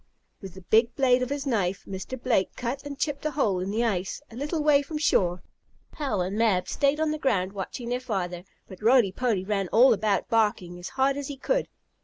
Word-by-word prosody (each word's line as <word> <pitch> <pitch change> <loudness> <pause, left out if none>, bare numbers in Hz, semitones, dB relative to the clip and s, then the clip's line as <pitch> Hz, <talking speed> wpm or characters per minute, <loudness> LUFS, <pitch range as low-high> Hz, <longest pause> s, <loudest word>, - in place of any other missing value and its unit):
With 190 -3 -9
the 190 - -10
big 225 +6 +2
blade 255 -2 +3
of 255 - -1
his 285 0 -3
knife, 200 -8 -1
Mr. 195 +7 -6
Blake 235 -6 0
cut 250 +3 -3
and 285 -1 -7
chipped 285 -1 -2
a 305 - 0
hole 225 -11 0
in 185 +2 -3
the 220 +4 0
ice, 195 -5 -1
a - - -11
little 300 +4 -2
way 295 -2 +5
from 300 +2 -5
shore. 180 - +1 0.5
Hal 270 - -2
and 185 +3 -2
Mab 210 -5 +2
stayed 280 +1 +1
on 315 -1 +1
the 310 - -3
ground 195 -9 0
watching 205 +5 -5
their 245 +1 -1
father, 180 -8 -3 0.2
but 190 - -12
Roly 230 -3 +4
Poly 210 -3 -1
ran 195 -2 -1
all 240 +8 +6
about, 210 -1 0
barking 205 -6 0
as 175 - -6
hard 270 +1 +2
as 285 -1 -4
he 285 - -6
could. - - 0
230 Hz, 220 wpm, -26 LUFS, 190-275 Hz, 0.5 s, all